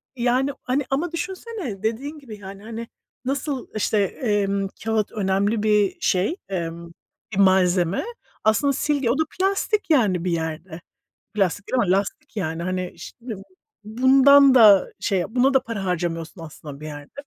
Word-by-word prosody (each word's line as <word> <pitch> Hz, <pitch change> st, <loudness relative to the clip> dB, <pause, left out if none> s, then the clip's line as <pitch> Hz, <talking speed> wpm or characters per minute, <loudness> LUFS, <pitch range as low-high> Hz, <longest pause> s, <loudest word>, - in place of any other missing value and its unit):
yani, 250 Hz, +3 st, +1 dB
hani 265 Hz, +3 st, -1 dB
ama 310 Hz, +5 st, -1 dB
düşünsene, 360 Hz, -, -5 dB
dediğin 275 Hz, +8 st, -3 dB
gibi 225 Hz, -7 st, -10 dB
yani, 195 Hz, +1 st, -10 dB
hani, 230 Hz, +1 st, -7 dB, 0.4 s
nasıl 275 Hz, 0 st, -2 dB
işte, 215 Hz, 0 st, 0 dB
emm, 200 Hz, -2 st, -1 dB, 0.2 s
kağıt 220 Hz, -2 st, 0 dB
önemli 205 Hz, +1 st, 0 dB
bir 210 Hz, -2 st, +2 dB
şey, 190 Hz, -, +1 dB
emm, 170 Hz, -2 st, -4 dB, 0.4 s
bir -, -, -3 dB
malzeme; 185 Hz, -2 st, +3 dB, 0.4 s
aslında 220 Hz, +6 st, +3 dB
silgi 280 Hz, -3 st, 0 dB
o 255 Hz, -, +1 dB
da 315 Hz, -, +3 dB, 0.2 s
plastik 395 Hz, +1 st, 0 dB
yani, 205 Hz, -, +3 dB
bir 180 Hz, -, -1 dB
yerde. 160 Hz, +1 st, -4 dB, 0.5 s
Plastik 200 Hz, -1 st, 0 dB
değil 255 Hz, -, 0 dB
ama 180 Hz, -, +1 dB
lastik 200 Hz, +2 st, -5 dB
yani. 165 Hz, -2 st, -2 dB
Hani 185 Hz, 0 st, -3 dB
şimdi 235 Hz, -4 st, -8 dB, 0.5 s
bundan 265 Hz, +4 st, +6 dB
da 210 Hz, -5 st, +7 dB
şey, 190 Hz, -3 st, 0 dB
buna 255 Hz, +3 st, +2 dB
da 265 Hz, -, +5 dB
para 210 Hz, -4 st, -5 dB
harcamıyorsun 165 Hz, -1 st, -3 dB
aslında 150 Hz, -2 st, -10 dB
bir 155 Hz, -, -9 dB
yerde. 145 Hz, -1 st, -9 dB
210 Hz, 150 wpm, -23 LUFS, 185-260 Hz, 0.5 s, da